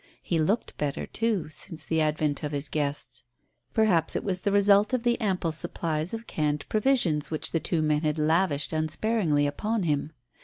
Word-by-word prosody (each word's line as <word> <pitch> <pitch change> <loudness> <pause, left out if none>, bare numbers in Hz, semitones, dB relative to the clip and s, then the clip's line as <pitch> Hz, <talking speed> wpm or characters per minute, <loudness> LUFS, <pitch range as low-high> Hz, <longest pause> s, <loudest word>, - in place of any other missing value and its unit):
He 170 - 0
looked 195 +9 0
better, 145 -2 -2
too, 220 -7 -1
since 155 +1 -5
the 160 -1 +1
advent 150 -1 0
of 150 -1 -4
his 145 0 -3
guests. 140 -4 -3 0.5
Perhaps 190 -8 +3
it - - -1
was 185 -2 -2
the 200 - 0
result 205 +3 +5
of 240 - -3
the 240 0 +1
ample 185 -5 0
supplies 160 0 -3
of 225 0 -5
canned 150 -5 -2
provisions 215 - +1
which 155 - -2
the 165 - +1
two 160 +1 -1
men 150 -1 +1
had 155 -1 0
lavished 155 -1 +1
unsparingly 155 -1 +1
upon 210 +8 -1
him. 150 -2 -1
160 Hz, 180 wpm, -27 LUFS, 150-200 Hz, 0.5 s, result